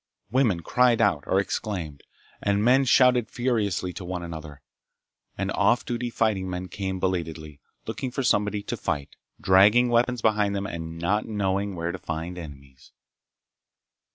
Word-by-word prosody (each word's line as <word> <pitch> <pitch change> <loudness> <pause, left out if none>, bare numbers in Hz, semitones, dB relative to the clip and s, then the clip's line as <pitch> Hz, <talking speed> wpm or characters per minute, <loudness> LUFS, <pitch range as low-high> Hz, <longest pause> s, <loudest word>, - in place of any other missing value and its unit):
Women 115 -9 +2
cried 120 +5 +3
out 75 -10 +2
or 95 - +3
exclaimed, 90 -6 -3 0.4
and 100 0 +1
men 130 +3 +4
shouted 125 -2 +4
furiously 105 -7 -1
to 100 - -7
one 90 0 -4
another, 80 -4 -8 0.7
and - - -2
off 120 - +2
duty 120 0 -3
fighting 105 -5 0
men 90 0 -5
came 95 -2 -4
belatedly 80 -5 -3 0.3
looking 130 - -4
for 130 +2 -3
somebody 105 -3 +1
to 120 - -3
fight, 75 -9 -3 0.2
dragging 105 +6 +5
weapons 120 0 +1
behind 105 -2 +2
them 100 0 -2
and 80 -3 -6
not 95 +6 0
knowing 100 -2 -1
where 85 0 -2
to 95 - -7
find 85 +2 -5
enemies. 70 -5 -12
95 Hz, 150 wpm, -25 LUFS, 85-115 Hz, 0.7 s, dragging